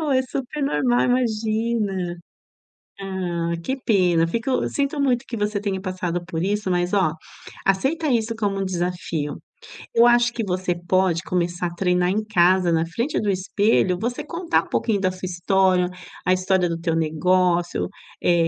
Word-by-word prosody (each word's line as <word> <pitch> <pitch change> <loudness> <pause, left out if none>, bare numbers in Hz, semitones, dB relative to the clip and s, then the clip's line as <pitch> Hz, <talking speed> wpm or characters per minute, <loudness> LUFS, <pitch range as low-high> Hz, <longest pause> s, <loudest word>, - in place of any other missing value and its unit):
normal, 310 -2 -1
é 260 - +4
super 265 +2 -5
normal, 245 -3 +2
imagina. 220 -6 0 0.9
Ah, 175 -3 -2
que 265 +9 -2
pena, 180 -10 +2
fico, 230 +9 -1
sinto 285 +1 -1
muito 260 -2 +1
que 235 - -6
você 210 -1 -1
tenha 195 -2 -2
passado 180 -2 -3
por 165 -1 -3
isso, 205 +1 -1
mas 175 0 0
ó, 190 -6 +2 0.5
aceita 270 - +1
isso 230 -3 +1
como 205 -3 -1
um - - 0
desafio. 175 -4 -3 0.6
Eu 235 +1 +6
acho 240 0 +4
que 235 - -2
você 185 -2 -1
pode 185 -2 +2
começar 175 -1 -1
a 170 - -8
treinar 180 0 +1
em 210 +3 0
casa, 185 -3 +3
na 165 0 +1
frente 235 - -2
do 210 - 0
espelho, 190 -1 +1
você 240 +2 -2
contar 340 0 0
um - - -15
pouquinho 215 -4 0
da 185 -1 +1
sua 185 0 -6
história, 180 0 +2 0.4
a 185 - +4
história 185 0 +2
do 165 -1 -3
teu 165 -1 -1
negócio, 175 +2 +1 0.4
eh, 170 -1 +3
190 Hz, 165 wpm, -23 LUFS, 175-230 Hz, 0.9 s, Eu